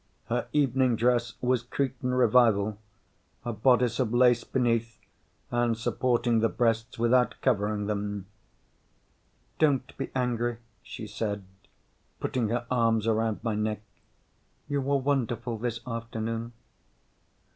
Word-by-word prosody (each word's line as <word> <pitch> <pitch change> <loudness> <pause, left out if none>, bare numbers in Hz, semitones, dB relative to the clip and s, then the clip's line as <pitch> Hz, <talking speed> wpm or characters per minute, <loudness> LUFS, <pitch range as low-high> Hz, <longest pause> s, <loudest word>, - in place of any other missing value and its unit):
Her 120 +1 -1
evening 130 -4 +2
dress 120 0 +1
was 125 -1 +2
Cretan 125 0 -2
Revival, 110 -4 +4 0.7
a 120 - -2
bodice 125 +2 +3
of 120 -4 +1
lace 120 -1 +4
beneath 115 -3 0 0.5
and 120 -1 +1
supporting 120 0 +1
the 115 0 +2
breasts 115 -1 0
without 125 +2 +3
covering 105 -4 +1
them. 100 -1 -3 1.3
"Don't 140 -4 +2
be - - -3
angry," 120 -2 0 0.2
she 110 - -8
said, 105 -1 -3 0.8
putting 120 -4 -1
her 120 +1 -1
arms 115 -3 +2
around 110 -1 0
my 115 -3 0
neck. 105 0 -2 0.8
"You 145 -1 0
were 140 +1 +1
wonderful 120 -4 -1
this 115 0 -3
afternoon." 115 -1 -4
120 Hz, 115 wpm, -28 LUFS, 110-125 Hz, 1.3 s, Revival